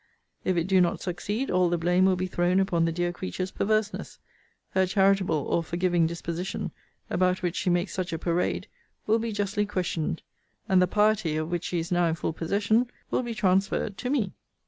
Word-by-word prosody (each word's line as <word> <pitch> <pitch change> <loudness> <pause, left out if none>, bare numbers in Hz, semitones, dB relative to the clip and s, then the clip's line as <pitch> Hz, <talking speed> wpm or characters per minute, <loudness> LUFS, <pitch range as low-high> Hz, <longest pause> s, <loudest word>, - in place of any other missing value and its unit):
If 185 -1 +1
it 170 - +2
do 190 +1 +3
not 175 -1 +1
succeed, 205 +8 -3
all 180 -1 +3
the 175 - +1
blame 180 +2 +3
will 190 -1 +4
be 185 +1 -2
thrown 180 +1 +1
upon 175 -4 +2
the 165 - +1
dear 175 +1 -1
creature's 185 +1 -4
perverseness: 215 0 -1 0.5
her 190 0 +2
charitable 195 -2 +3
or 170 - +1
forgiving 170 0 +1
disposition, 170 +2 -4 0.4
about 185 +1 +1
which 175 -1 -1
she 190 - 0
makes 175 +2 +1
such 185 -1 -3
a 165 - -2
parade, 170 +2 -1 0.4
will 220 +2 +3
be 230 0 -2
justly 205 0 -1
questioned; 175 -5 -2 0.4
and 190 -1 +4
the 180 - +4
piety, 210 -5 +2
of 155 +2 -3
which 175 0 -2
she 180 - -2
is 165 +1 -3
now 175 -1 +3
in 160 - 0
full 160 - -2
possession, 205 +8 +1 0.2
will - - +2
be 240 -2 -4
transferred 195 +1 +1
to 250 - -3
me. 240 -9 0
185 Hz, 195 wpm, -27 LUFS, 175-200 Hz, 0.5 s, will